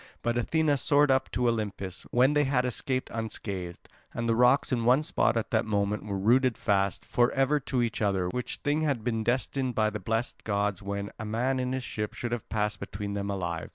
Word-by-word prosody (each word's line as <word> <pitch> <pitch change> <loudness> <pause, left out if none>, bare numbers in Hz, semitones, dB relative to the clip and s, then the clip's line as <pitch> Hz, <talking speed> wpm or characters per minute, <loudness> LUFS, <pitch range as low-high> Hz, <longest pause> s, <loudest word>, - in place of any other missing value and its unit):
But 120 +1 0
Athena 150 +4 +2
soared 145 +1 +4
up 130 0 +2
to 125 -1 0
Olympus, 105 -5 -3
when 130 +4 +4
they 150 0 +3
had 130 -2 +1
escaped 130 +1 -2
unscathed. 100 -5 -5 0.3
And 115 - -2
the 115 - +3
rocks 125 +5 +4
in 120 -2 +1
one 125 +5 +4
spot 115 - +1
at 115 - -2
that 110 - +2
moment 105 -1 -1
were 100 -1 -2
rooted 120 +5 +3
fast 100 -2 0
for 120 0 +2
ever 135 +2 +2
to 130 -2 -1
each 115 -1 -2
other, 95 -3 +1
which 125 +5 -3
thing 145 +2 +1
had 140 -8 0
been 115 -2 -1
destined 130 +1 -1
by 110 -2 +2
the 105 - -4
blessed 115 +5 -2
gods, 100 -2 -1
when 100 0 -4
a 110 - -4
man 125 +5 0
in 125 0 -1
his 130 -1 -2
ship 105 -3 -4
should 120 - -4
have 120 -2 -4
passed 105 -2 -1
between 100 +1 -5
them 100 0 -3
alive. 85 -4 -3
115 Hz, 215 wpm, -28 LUFS, 105-130 Hz, 0.3 s, soared